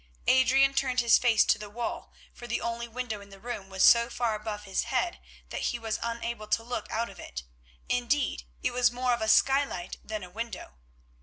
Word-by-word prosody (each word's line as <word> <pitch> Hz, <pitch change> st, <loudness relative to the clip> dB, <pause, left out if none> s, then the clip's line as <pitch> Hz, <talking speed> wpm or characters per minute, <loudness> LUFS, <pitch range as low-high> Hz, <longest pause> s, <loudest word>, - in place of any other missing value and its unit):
Adrian 265 Hz, +1 st, +5 dB
turned 255 Hz, -2 st, +1 dB
his 235 Hz, -1 st, +5 dB
face 230 Hz, -3 st, +4 dB
to 215 Hz, -, +3 dB
the 210 Hz, -1 st, -7 dB
wall, 235 Hz, +3 st, -5 dB, 0.2 s
for 240 Hz, -, -10 dB
the 240 Hz, -, -1 dB
only 235 Hz, 0 st, -3 dB
window 235 Hz, -3 st, -4 dB
in 200 Hz, -, -14 dB
the 195 Hz, 0 st, -13 dB
room 210 Hz, -4 st, -6 dB
was 190 Hz, -1 st, 0 dB
so 235 Hz, 0 st, +7 dB
far 235 Hz, -2 st, -1 dB
above 210 Hz, -1 st, -5 dB
his 195 Hz, -2 st, -1 dB
head -, -, -1 dB, 0.3 s
that -, -, -4 dB
he 240 Hz, -, 0 dB
was 225 Hz, -2 st, -3 dB
unable 235 Hz, -1 st, -4 dB
to 225 Hz, -, +1 dB
look 240 Hz, +1 st, -4 dB
out 230 Hz, +2 st, -1 dB
of -, -, -13 dB
it; 65 Hz, 0 st, -7 dB, 0.4 s
indeed, 245 Hz, -, 0 dB, 0.2 s
it -, -, +1 dB
was 245 Hz, 0 st, +3 dB
more 250 Hz, 0 st, 0 dB
of 235 Hz, -, -2 dB
a 220 Hz, -, 0 dB
skylight 270 Hz, -8 st, +2 dB
than 215 Hz, -2 st, -5 dB
a 180 Hz, -, -9 dB
window. 225 Hz, -, -6 dB
235 Hz, 210 wpm, -28 LUFS, 215-245 Hz, 0.4 s, so